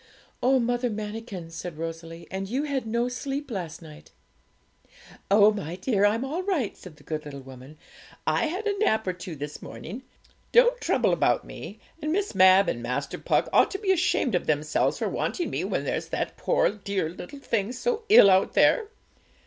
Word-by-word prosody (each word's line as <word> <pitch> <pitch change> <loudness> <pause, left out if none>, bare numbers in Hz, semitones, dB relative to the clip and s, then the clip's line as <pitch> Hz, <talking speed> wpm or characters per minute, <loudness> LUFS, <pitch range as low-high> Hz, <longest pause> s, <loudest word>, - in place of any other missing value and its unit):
'Oh, 260 +1 +4
Mother 245 +1 0
Manikin!' 210 -5 -6
said 165 0 -7
Rosalie; 165 +1 -7
'and 190 0 -4
you 265 +6 -1
had 275 -5 -2
no 235 +2 0
sleep 270 +2 -4
last 175 -6 -5
night.' 155 0 -13 1.2
'Oh, 205 +1 +6
my 180 -5 -5
dear, 205 +1 +2
I'm 225 +5 0
all 310 +7 -3
right,' 360 - -1
said 180 -4 -13
the - - -20
good 155 -1 -4
little 140 -2 -8
woman. 130 +3 -12 0.5
'I - - +2
had 370 +7 -4
a 410 -1 +1
nap 220 - +2
or 185 - -1
two 180 -2 -8
this 145 +1 -7
morning. 215 +11 -8 0.5
Don't - - +5
trouble - - +2
about - - +2
me; - - -9 0.2
and 305 - -2
Miss 400 - -1
Mab 190 0 +6
and 120 - -2
Master 125 +4 -3
Puck - - +1
ought - - +5
to 390 - -4
be 390 -1 0
ashamed 340 - +1
of 180 - 0
themselves 150 0 +1
for - - -1
wanting 350 - -2
me - - -2
when - - -1
there's - - -2
that - - -3
poor - - +2
dear 200 -5 -3
thing 225 +1 -3
so 455 - -2
ill 210 - +9
out 190 +1 +3
there. 450 -3 +4
205 Hz, 185 wpm, -26 LUFS, 165-270 Hz, 1.2 s, ill